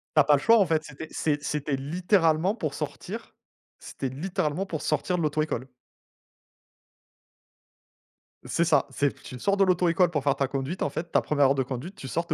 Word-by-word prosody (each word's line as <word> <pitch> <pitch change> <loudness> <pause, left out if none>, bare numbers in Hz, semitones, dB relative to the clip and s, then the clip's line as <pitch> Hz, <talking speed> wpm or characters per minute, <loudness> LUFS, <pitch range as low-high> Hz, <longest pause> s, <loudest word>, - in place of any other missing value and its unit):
Tu 155 - +7
as - - +5
pas 145 - +5
le 140 - +3
choix 230 +10 +6
en 200 - +4
fait, 160 -1 +1
c'était 150 +1 -9
c'est 145 -2 -1
c'était 150 0 -2
littéralement 165 +4 +2
pour - - -3
sortir - - -6 0.5
c'était 135 - -5
littéralement 155 +4 -2
pour 165 -6 -5
sortir 170 +4 0
de - - 0
l'auto-école. 150 -4 -1 2.8
C'est 170 - +1
ça, 170 - +3
c'est 140 +2 0
tu 125 - -9
sors 200 +10 +1
de 200 - +4
l'auto-école 180 -1 +3
pour 150 -4 -1
faire 140 0 +2
ta 135 -1 0
conduite 135 +6 -3
en - - 0
fait, 160 +4 -3
ta - - +3
1re 145 -2 +3
heure 135 - +3
de 135 - +1
conduite, 130 +8 -6
tu 135 - -8
sors, 170 +6 -2
tu 170 - -3
155 Hz, 195 wpm, -26 LUFS, 140-175 Hz, 2.8 s, Tu